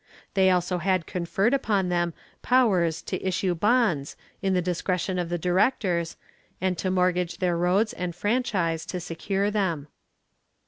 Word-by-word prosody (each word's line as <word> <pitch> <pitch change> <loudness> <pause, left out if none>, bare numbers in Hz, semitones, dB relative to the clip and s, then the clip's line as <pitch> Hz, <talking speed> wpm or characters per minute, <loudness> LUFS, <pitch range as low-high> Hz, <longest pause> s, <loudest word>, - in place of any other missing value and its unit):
They 190 -1 +4
also 180 0 +1
had 185 -1 +1
conferred 195 +6 0
upon 205 -9 +1
them 175 -1 0 0.3
powers 190 -11 +2
to - - -4
issue 190 -1 0
bonds, 185 - +1 0.3
in 195 -2 +1
the - - +3
discretion 180 +1 -1
of 175 -1 -2
the 175 - -1
directors, 180 -1 +1 0.4
and 185 0 0
to 185 - -1
mortgage 180 -1 +1
their 180 -2 +1
roads 185 +6 +2
and 180 -2 -4
franchise 190 -6 0
to 180 - -3
secure 195 +4 -2
them. 170 -8 -1
180 Hz, 145 wpm, -26 LUFS, 175-195 Hz, 0.4 s, They